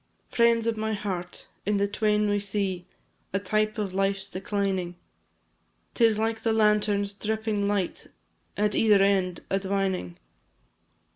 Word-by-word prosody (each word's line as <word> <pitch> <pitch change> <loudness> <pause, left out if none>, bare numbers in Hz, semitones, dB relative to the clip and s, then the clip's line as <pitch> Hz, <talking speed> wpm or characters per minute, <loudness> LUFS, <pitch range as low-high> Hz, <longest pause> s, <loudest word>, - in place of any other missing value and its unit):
Friends 235 -1 +3
of 230 -1 0
my 220 0 -1
heart! 185 -4 -4 0.2
in 210 0 +1
the 200 0 +2
twain 210 0 +1
we 205 0 +1
see 195 -3 -2 0.5
A - - +2
type 215 +3 0
of 200 -3 -2
life's 195 0 0
declining; 190 -2 -2 1.0
'Tis 225 -3 +3
like 225 0 -1
the 225 - +1
lantern's 210 -2 +2
dripping 215 0 -1
light, 200 -3 -2 0.5
At 210 0 +1
either 210 -3 +5
end 190 -3 +1
a 195 - +2
dwining. 190 - -2
205 Hz, 135 wpm, -27 LUFS, 195-215 Hz, 1.0 s, either